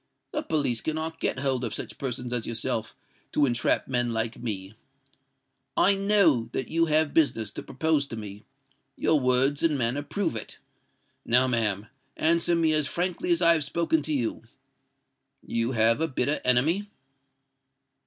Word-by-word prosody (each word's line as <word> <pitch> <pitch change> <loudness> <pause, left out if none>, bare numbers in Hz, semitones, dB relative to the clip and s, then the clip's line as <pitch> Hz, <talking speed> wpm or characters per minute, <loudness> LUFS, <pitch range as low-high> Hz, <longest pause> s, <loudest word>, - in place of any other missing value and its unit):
The - - -2
police 140 -7 0
cannot 160 +1 -3
get - - -1
hold 130 -2 -1
of 115 - -3
such - - -6
persons 125 -2 -4
as 120 -3 -1
yourself 115 -1 -2 0.4
to 150 - +3
entrap 120 -3 0
men 120 -1 +1
like 115 0 -2
me. 100 -4 -5 1.0
I 200 - +5
know 195 - +2
that - - -3
you 165 +1 +1
have 155 -1 +2
business 115 -10 +1
to - - -7
propose 145 +1 -1
to 115 - -7
me: 105 -1 -8 0.5
your 155 - +2
words 130 +2 +2
and 155 -3 +2
manner 120 +3 +1
prove 180 - -2
it. 110 - -6 0.7
Now, 125 +2 +4
ma'am, 105 -5 -1 0.3
answer 170 +2 +3
me 160 -2 +2
as 155 -2 +2
frankly 180 +2 -2
as 170 +1 +2
I 170 0 +7
have 160 -2 0
spoken 160 +2 0
to 155 - -4
you. 125 -6 -1 1.0
You 115 +2 -1
have 115 +4 +3
a 160 - +1
bitter 140 +1 -1
enemy?" 160 +12 +2
140 Hz, 160 wpm, -26 LUFS, 115-160 Hz, 1.0 s, I